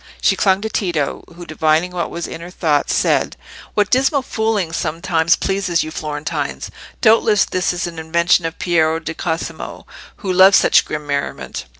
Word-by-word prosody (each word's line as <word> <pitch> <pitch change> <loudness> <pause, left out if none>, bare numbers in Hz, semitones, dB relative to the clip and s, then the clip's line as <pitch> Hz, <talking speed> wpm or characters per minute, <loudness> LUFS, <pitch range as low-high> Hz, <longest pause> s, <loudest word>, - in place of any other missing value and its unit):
She - - +3
clung 195 -1 +2
to 220 - -2
Tito, 170 -10 -2
who, 175 0 -9
divining 155 +2 +1
what 175 -1 -3
was 170 - -5
in 165 - -7
her 170 - -8
thoughts, 155 -5 0
said— - - +1 0.4
"What 210 -1 +1
dismal 270 +2 +2
fooling 220 -8 -1
sometimes 165 0 +1
pleases 195 -3 0
your 155 - -7
Florentines! 150 -1 -4 0.3
Doubtless 220 -2 +4
this 185 -1 -1
is 175 0 -3
an 170 -2 -6
invention 170 +1 +2
of 165 - -8
Piero 160 -2 +1
di 160 0 -5
Cosimo, 165 0 -5 0.3
who 190 -4 -3
loves 190 +2 +7
such - - +4
grim 150 -1 -5
merriment." 140 -1 -4
170 Hz, 170 wpm, -18 LUFS, 160-195 Hz, 0.4 s, loves